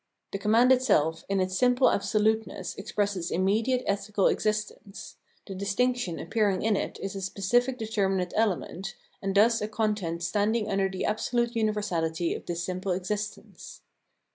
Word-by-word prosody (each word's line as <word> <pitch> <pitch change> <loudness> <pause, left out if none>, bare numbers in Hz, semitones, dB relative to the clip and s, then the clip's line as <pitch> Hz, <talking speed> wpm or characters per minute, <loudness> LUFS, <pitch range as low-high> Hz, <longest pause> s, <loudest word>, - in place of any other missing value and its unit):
The 195 - -3
command 225 +5 +4
itself 195 - +3
in 195 0 +1
its 185 0 -1
simple 250 +4 +4
absoluteness 220 +2 0
expresses 200 -3 -2
immediate 220 +8 +1
ethical 200 0 0
exist 215 0 +1
ence; 200 0 -11 0.3
the 195 - -7
distinction 200 0 0
appearing 205 -4 0
in 220 -1 +2
it - - -3
is. 195 0 -4
a 195 - -4
specific 240 +7 +1
determinate 195 -5 -1
element, 195 -3 -1 0.3
and 195 0 -2
thus 225 +3 +4
a 210 - -1
content 210 -6 -2
standing 210 +5 +1
under 195 -1 +1
the 190 -1 -3
absolute 235 +2 0
universality 175 -7 0
of - - -8
this 170 0 -2
simple 185 +1 -2
existence. 210 - -5
205 Hz, 145 wpm, -27 LUFS, 190-220 Hz, 0.3 s, command